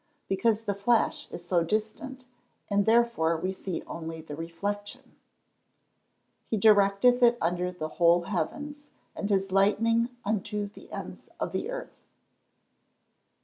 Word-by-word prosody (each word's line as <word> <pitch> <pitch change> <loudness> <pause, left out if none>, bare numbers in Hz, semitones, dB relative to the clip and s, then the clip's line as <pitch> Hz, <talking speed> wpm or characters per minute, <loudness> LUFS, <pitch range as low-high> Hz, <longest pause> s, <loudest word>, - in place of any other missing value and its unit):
_ - - -44 0.2
Because 215 +3 +1
the 205 -2 -1
flash 220 +4 +1
is 175 - -8 0.2
distant, 250 - -3 0.5
and 200 0 +2
therefore 225 -8 +3
we 185 +4 -2
see 190 -2 -5
only 165 -1 -6
the 155 -2 -8
reflection. 200 +6 -5
[Verse: - - -38
"He 220 - 0
directeth 210 +4 +5
it 240 0 +6
under 180 +2 0
the 165 -3 -5
whole 170 0 +5
heavens, 290 - -4 0.3
and 205 - -3
his 195 -1 +1
lightning 230 +4 +3 0.2
unto 210 0 -1
the 205 - -13
ends - - -8
of - - -2
the - - -3
earth." - - -8
205 Hz, 135 wpm, -28 LUFS, 180-230 Hz, 0.5 s, it